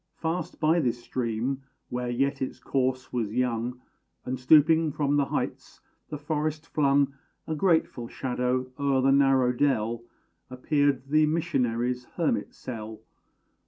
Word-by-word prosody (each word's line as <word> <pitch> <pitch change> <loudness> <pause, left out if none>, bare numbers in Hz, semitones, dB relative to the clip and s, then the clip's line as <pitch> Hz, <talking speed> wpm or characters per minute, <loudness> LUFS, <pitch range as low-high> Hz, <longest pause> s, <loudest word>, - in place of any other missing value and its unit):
Fast 165 +2 -3
by 160 +2 +3
this 120 -5 -1
stream, 125 +2 -2 0.3
where 125 0 -3
yet 135 +3 0
its 130 - -3
course 130 -1 -1
was 110 -4 -2
young, 125 0 -1 0.5
And, 130 0 -3
stooping 155 +4 +5
from 145 0 0
the 145 -1 +3
heights, - - -4 0.3
the 150 - -4
forest 155 +1 -2
flung 140 -3 +2 0.3
A 160 - -3
grateful 160 -7 +1
shadow 125 0 -2
o'er 140 -2 +2
the 135 - +4
narrow 135 -2 +4
dell, 120 -4 0 0.5
Appeared 135 +1 0
the 155 +1 +4
missionary's 125 -6 0
hermit - - -1
cell. 110 -3 -7
135 Hz, 130 wpm, -27 LUFS, 125-145 Hz, 0.5 s, stooping